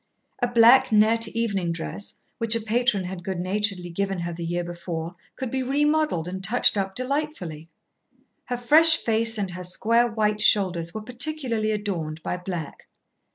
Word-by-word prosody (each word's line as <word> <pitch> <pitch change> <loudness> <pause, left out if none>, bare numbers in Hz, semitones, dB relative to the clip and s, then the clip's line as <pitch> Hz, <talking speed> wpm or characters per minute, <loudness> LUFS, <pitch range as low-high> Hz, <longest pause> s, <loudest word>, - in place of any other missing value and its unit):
A 245 - +2
black 240 +2 +5
net 220 +1 +3
evening 205 -6 -2
dress, 170 +4 -6 0.2
which 230 -1 +4
a - - +1
patron 225 -2 +1
had 180 -1 -7
good 190 0 -4
naturedly 185 -1 -2
given 195 0 -2
her 170 0 -4
the 170 +1 -7
year 175 +1 -2
before, 170 -1 -6 0.2
could 260 -3 -5
be 265 - -1
remodelled 295 - 0
and 190 +1 -6
touched 225 +4 +3
up 195 -1 -2
delightfully. 255 - -4 0.8
Her 245 - -3
fresh 320 +6 +6
face 225 0 +1
and 195 -3 -3
her 180 +1 -7
square 230 +6 +2
white 210 -1 0
shoulders 180 -6 +2
were 215 +3 -7
particularly 250 -3 -2
adorned 175 -7 -3
by - - -3
black. 180 -4 -7
210 Hz, 160 wpm, -24 LUFS, 180-240 Hz, 0.8 s, fresh